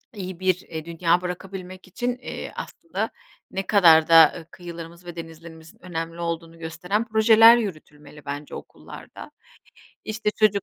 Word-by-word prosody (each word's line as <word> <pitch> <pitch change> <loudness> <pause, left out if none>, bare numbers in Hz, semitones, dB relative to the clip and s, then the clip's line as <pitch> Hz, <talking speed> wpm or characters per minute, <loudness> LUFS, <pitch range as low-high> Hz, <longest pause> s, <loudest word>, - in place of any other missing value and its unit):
iyi 185 -3 -7
bir, 185 -1 +2
eee, 160 -1 -8
dünya 170 +1 +1
bırakabilmek 185 +1 -7
için, 245 +5 -3
eee, 250 - -7
aslında - - -5 0.4
ne 195 0 -4
kadar 165 -6 +6
da, - - +4
aaa, 160 0 +6
kıyılarımız 170 -1 -10
ve 175 - -8
denizlerimizin 165 0 -11
önemli 165 -1 -5
olduğunu 165 0 -5
gösteren 180 +7 -2
projeler 225 +1 +7
yürütülmeli 150 -8 -7
bence 145 +1 -6
okullarda. - - -11 0.7
İşte 215 -1 -2
çocuk 210 -2 +2
175 Hz, 135 wpm, -24 LUFS, 165-195 Hz, 0.7 s, projeler